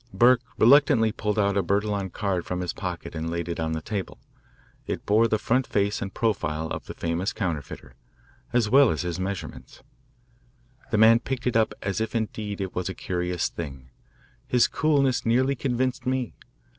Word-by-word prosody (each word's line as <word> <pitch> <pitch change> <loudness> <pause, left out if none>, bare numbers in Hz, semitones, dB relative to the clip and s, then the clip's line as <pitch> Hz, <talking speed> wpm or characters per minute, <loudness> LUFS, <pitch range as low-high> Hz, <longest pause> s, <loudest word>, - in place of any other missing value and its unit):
Burke 120 0 +5 0.2
reluctantly 130 -2 +5
pulled 105 -1 -2
out 100 -1 +2
a 100 - +3
Bertillon 100 +1 -1
card 95 -3 -2
from 90 +1 -3
his 90 - -3
pocket - - -5
and 80 0 -3
laid 85 0 -3
it 85 - -4
on 80 0 -1
the 80 -1 -4
table. 100 -4 -4 0.7
It - - -4
bore 110 +3 +4
the 110 - +1
front 125 +4 0
face 100 0 0
and 100 - -4
profile 80 -9 -1
of - - -6
the - - -7
famous 85 +3 -2
counterfeiter, 80 - -4 0.6
as 120 -2 +2
well 135 +2 +6
as 80 - -1
his 90 0 -3
measurements. 95 0 -6 1.1
The 115 - +1
man 110 +2 +7
picked 130 +1 -4
it 125 - 0
up 110 -1 +2
as 100 +2 -2
if 110 +1 -3
indeed 105 -2 -3
it 95 -1 -4
was 90 +1 -2
a 95 - -5
curious 90 -1 -2
thing. 70 -6 -8 0.6
His 125 -1 +4
coolness 140 -5 +1
nearly 130 +4 +2
convinced 130 -1 -2
me. 130 -2 -1
105 Hz, 180 wpm, -25 LUFS, 90-120 Hz, 1.1 s, man